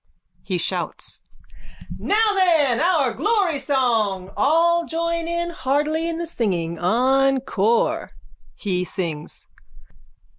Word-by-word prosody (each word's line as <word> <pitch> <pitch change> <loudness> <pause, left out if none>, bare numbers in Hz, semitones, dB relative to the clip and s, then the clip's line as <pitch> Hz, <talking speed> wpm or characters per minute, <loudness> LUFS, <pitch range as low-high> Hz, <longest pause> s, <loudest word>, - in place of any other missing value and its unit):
(He 185 - -2
shouts.) 170 - -4 0.8
Now 430 +1 +2
then 325 - +3
our 315 -8 +2
glory 390 - +1
song. 225 -9 0
All 335 +4 +3
join 335 +1 -2
heartily 305 +2 -1
in 330 - -3
the 340 - -3
singing. 175 - -2
Encore! 250 +1 +1 0.5
_(He 180 -4 -1
sings.) 170 -5 -5
275 Hz, 90 wpm, -22 LUFS, 215-335 Hz, 0.8 s, then